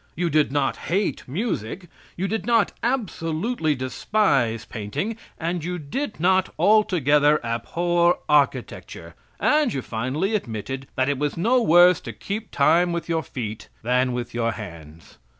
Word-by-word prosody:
You 170 0 -1
did 150 -3 +3
not 145 0 0
hate 195 +4 -2
music, 175 - -3 0.3
you 190 +3 -1
did 220 -1 -3
not 230 -3 +3
absolutely 180 - -1
despise 130 - 0
painting, 115 - -4 0.2
and 170 0 -2
you 180 +2 -3
did 175 - -4
not 185 +2 +2
altogether 150 -8 +4
abhor 175 +9 +1
architecture, 150 -2 0 0.3
and 300 -4 +3
you 135 - -3
finally 130 - -2
admitted 130 - -4
that 130 0 +1
it 145 -2 0
was 150 +1 -1
no 240 +9 +3
worse 175 -2 +6
to - - -7
keep 210 +2 -5
time 170 +5 +3
with 170 0 -4
your 165 -1 +1
feet 110 -7 -6
than 125 +2 +2
with 120 -1 -4
your 115 -1 0
hands. 85 -6 -11
160 Hz, 145 wpm, -23 LUFS, 130-190 Hz, 0.3 s, worse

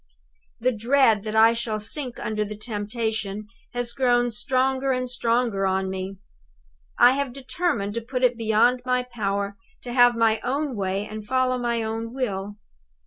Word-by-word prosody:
"The 255 +2 +2
dread 230 -1 +3
that 215 0 -3
I 225 +1 +6
shall 230 -2 -2
sink 250 +4 -4
under 215 -1 -1
the 210 0 -7
temptation 215 -1 -3 0.3
has 245 -1 -2
grown 245 -2 +2
stronger 265 +3 0
and 255 -1 -1
stronger 230 -5 +1
on 190 0 0
me. 190 +1 -5 0.8
I 245 - +7
have 275 -1 -1
determined 270 - -2
to 235 - -3
put 250 +2 -4
it 245 -1 +4
beyond 230 +2 +2
my 250 0 +1
power 200 -4 -3 0.2
to 245 - -6
have 245 -1 +6
my 225 -1 +3
own 280 -1 -1
way 195 0 -2
and 215 0 -7
follow 255 +2 +1
my 235 -1 -1
own 225 +2 -4
will. 205 -6 -3
235 Hz, 160 wpm, -24 LUFS, 210-250 Hz, 0.8 s, I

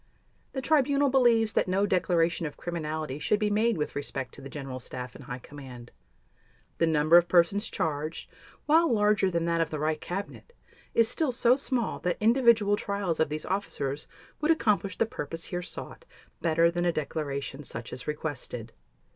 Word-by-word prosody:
The 265 - -3
Tribunal 285 -2 +3
believes 235 -4 +4
that - - +2
no 190 +2 +2
declaration 170 -3 +1
of 145 - -10
criminality 155 -4 -4
should 210 - +2
be 210 -1 +1
made 220 +1 +2
with 150 - -3
respect 135 -2 -4
to - - -12
the 135 - -8
General 135 -3 -6
Staff 125 0 -7
and 135 - -12
High 125 -2 -5
Command. 130 -3 -11 0.9
The 165 - +3
number 155 +1 +5
of 175 0 +4
persons 180 +4 +3
charged, 155 +1 -3 0.4
while 325 0 +4
larger 210 -3 +3
than 170 -2 -1
that 170 0 +1
of 165 - 0
the 155 - -3
Reich 155 +1 -1
Cabinet, 200 - -6 0.4
is 230 -1 +5
still 300 +3 +1
so 245 0 +4
small 255 -4 -2
that 180 - -1
individual 225 -3 +4
trials 200 -5 -2
of 160 - +2
these 155 +1 -4
officers 150 -7 -3 0.3
would 300 - 0
accomplish 205 - +2
the - - +3
purpose 165 -5 -6
here 175 -1 -3
sought - - -7 0.4
better 165 0 +3
than 175 0 -1
a 175 - +3
declaration 145 -3 -4
such 115 -2 -7
as 125 - -7
requested. 140 -6 -4
170 Hz, 175 wpm, -28 LUFS, 150-210 Hz, 0.9 s, number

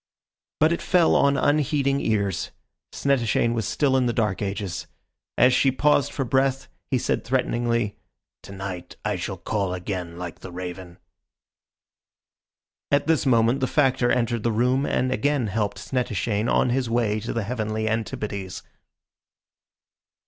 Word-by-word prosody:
But 155 +2 +4
it 170 - -3
fell 175 -3 +3
on 140 0 +4
unheeding 145 -1 +2
ears. 100 -5 0 0.4
Snettishane 120 -4 +1
was 115 -2 -2
still 140 -3 +1
in 130 -2 +3
the 120 - 0
dark 105 -5 0
ages. 100 -2 -3 0.5
As 125 +2 +5
she 135 +1 +4
paused 145 +1 +2
for 135 - -2
breath, 135 +1 +1 0.2
he 130 - +2
said - - -1
threateningly, 120 -4 0 0.4
"To - - -12
night 95 -2 -6
I 105 -1 0
shall 95 +2 -4
call 95 0 -2
again 90 -2 -5
like 90 -2 -7
the 95 - -9
raven." 90 0 -7 1.9
At 140 0 +2
this 160 -3 +2
moment 115 +1 +3
the 130 - +1
Factor 130 -4 +2
entered 120 -2 +1
the 115 - 0
room 125 +5 +1
and 130 0 0
again 140 -1 +1
helped 105 0 -1
Snettishane 115 -3 -1
on 125 - +3
his 125 -1 0
way 115 -2 +1
to 115 - -4
the 115 - -2
heavenly 110 -1 -2
antipodes. 105 -4 -3
115 Hz, 145 wpm, -24 LUFS, 100-130 Hz, 1.9 s, As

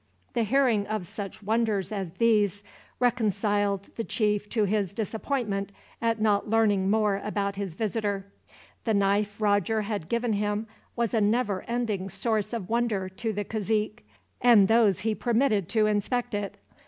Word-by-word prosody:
The 240 - +1
hearing 240 -4 +2
of 215 -4 -2
such 205 +2 -7
wonders 215 -2 0
as 190 -5 -4
these 205 -2 +2 0.4
reconciled 205 -4 +1
the 230 - -1
chief 210 -2 0
to 220 - +1
his 200 -2 0
disappointment 215 -1 -2 0.3
at 230 -1 +1
not 210 -1 +2
learning 205 -4 +3
more 210 -1 +2
about 200 -1 -2
his 195 -5 -4
visitor. 205 -2 -2 0.6
The 220 -3 +1
knife 200 +1 +1
Roger 210 +1 +2
had 200 -6 -4
given 235 -1 0
him 210 +1 -1 0.3
was 235 -2 -1
a 225 - +3
never 210 -2 +1
ending 220 -5 -2
source 210 +2 -1
of 225 -6 -4
wonder 225 -5 0
to 220 +4 -3
the 205 -1 -3
cazique, 215 0 -1 0.4
and 230 -5 +6
those 215 -4 +4
whom 220 - 0
he - - +1
permitted 225 -5 +1
to 220 0 +3
inspect 225 +4 0
it. 205 -1 -3
210 Hz, 155 wpm, -27 LUFS, 200-225 Hz, 0.6 s, and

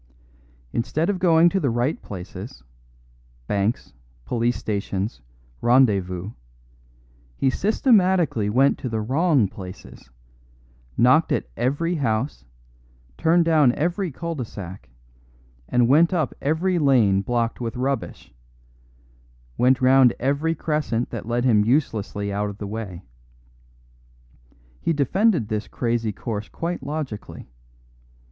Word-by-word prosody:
Instead 145 - 0
of 190 - -4
going 170 -2 +5
to 195 +3 +1
the 145 -7 0
right 120 +6 -1
places 100 - -9 0.8
banks, 100 - -1 0.3
police 120 - 0
stations, 100 0 -3 0.4
rendezvous 100 -7 +2 1.1
he 135 - +2
systematically 185 - +2
went 135 +6 +3
to 125 - -4
the 110 -1 -2
wrong 135 - +2
places; 90 -8 -11 0.9
knocked 130 +7 +4
at - - 0
every 145 +8 0
empty 165 -4 -2
house, 120 +3 -1 0.7
turned 170 - +3
down 155 -6 +4
every 175 +4 -1
cul 170 +5 -5
de 135 -6 -4
sac, 95 -4 -9 0.8
went 135 +8 +4
up 155 -6 0
every 170 +5 +1
lane 120 -10 +3
blocked 115 +2 -1
with 115 0 -4
rubbish, 130 - -3 1.2
went 130 +1 +3
round 130 -1 +5
every 145 +5 0
crescent 150 -7 -2
that 115 -2 -6
led 120 +1 0
him 110 -5 +4
uselessly 105 -5 -1
out 105 +1 -1
of 100 - -9
the 105 - -6
way. 100 -4 -6 1.8
He 165 - +1
defended 165 - +2
this 105 -1 -3
crazy 115 -2 -1
course 105 0 -5
quite 170 +1 -4
logically. 135 - -6
125 Hz, 115 wpm, -23 LUFS, 105-155 Hz, 1.8 s, going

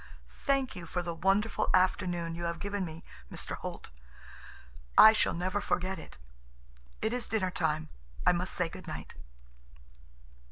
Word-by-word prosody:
"Thank 275 -2 +2
you 175 -2 -7
for 180 +2 -2
the 170 -1 -3
wonderful 195 +6 +1
afternoon 180 -2 +1
you 170 +1 -4
have 170 0 -2
given 200 +1 -2
me, 165 -1 -7 0.3
Mr. - - -3
Holt. - - -7 1.1
I 220 - +11
shall 220 - +1
never 185 +4 -1
forget 185 -1 -1
it. - - -11 0.9
It 220 - +1
is 245 -1 0
dinner 190 -5 0
time. 155 -3 0 0.4
I - - +7
must 180 +1 -2
say 180 - +1
good - - -10
night." - - -6
180 Hz, 150 wpm, -31 LUFS, 170-205 Hz, 1.1 s, I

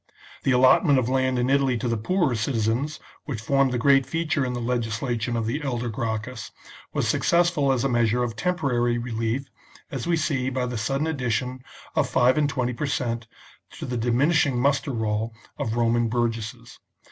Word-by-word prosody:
The 135 - +1
allotment 130 +3 +5
of 125 -1 +1
land 130 -1 +1
in 125 0 +1
Italy 135 -2 +2
to 120 - -3
the 115 - +1
poorer 150 - +1
citizens, 120 +5 -1 0.3
which 130 -7 -4
formed 135 +3 +2
the 125 - 0
great 135 +3 +4
feature 160 -1 0
in 125 -1 -2
the 120 - -3
legislation 120 0 -1
of 115 - -1
the 120 +8 -2
elder 120 -4 -2
Gracchus, 110 +1 -4 0.4
was - - -1
successful 170 -5 +2
as 130 -3 +1
a - - +3
measure 120 -1 +2
of 115 -2 -3
temporary 125 -7 0
relief, 115 +2 -2 0.5
as 135 0 -4
we 170 -1 +2
see 135 -5 0
by 130 -1 -1
the 125 0 -4
sudden 135 +7 -1
addition 125 -4 -2 0.3
of - - +1
five 125 +1 +4
and 150 -2 +2
twenty 125 -3 -1
per 145 +5 -3
cent, 120 -4 -2 0.5
to - - -7
the 125 - -3
diminishing 130 +4 +2
muster 140 +3 +1
roll 110 -2 -2 0.2
of 110 - -2
Roman 120 0 +2
burgesses. 115 -2 -3
125 Hz, 180 wpm, -25 LUFS, 115-140 Hz, 0.5 s, allotment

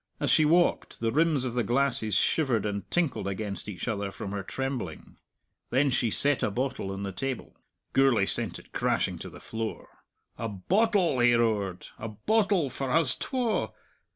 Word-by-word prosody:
As - - +1
she 155 - +5
walked, 170 +3 +2
the 115 0 0
rims 150 -1 +2
of 125 - -3
the 125 - +1
glasses 120 -2 0
shivered 125 -3 +2
and 100 -1 -3
tinkled 170 - 0
against 100 +1 -4
each 100 +2 -6
other, 100 -4 -2
from 95 - -6
her 100 -1 -3
trembling. 130 - -5 0.5
Then 135 +2 +2
she 120 -1 +1
set 140 +5 +4
a - - +1
bottle 125 -2 -2
on 95 +1 -5
the 100 - -3
table. 130 +6 -4 0.4
Gourlay 135 -7 +4
sent - - +1
it - - -16
crashing - - 0
to - - -7
the - - -12
floor. 110 -1 -5 0.5
"A 115 - -2
bottle!" 180 - +1
he 120 0 +5
roared. 105 -6 0
"A 115 - -4
bottle 190 - +1
for 135 +2 -4
huz 160 -3 +4
twa! 250 -4 -1
120 Hz, 175 wpm, -28 LUFS, 105-145 Hz, 0.5 s, she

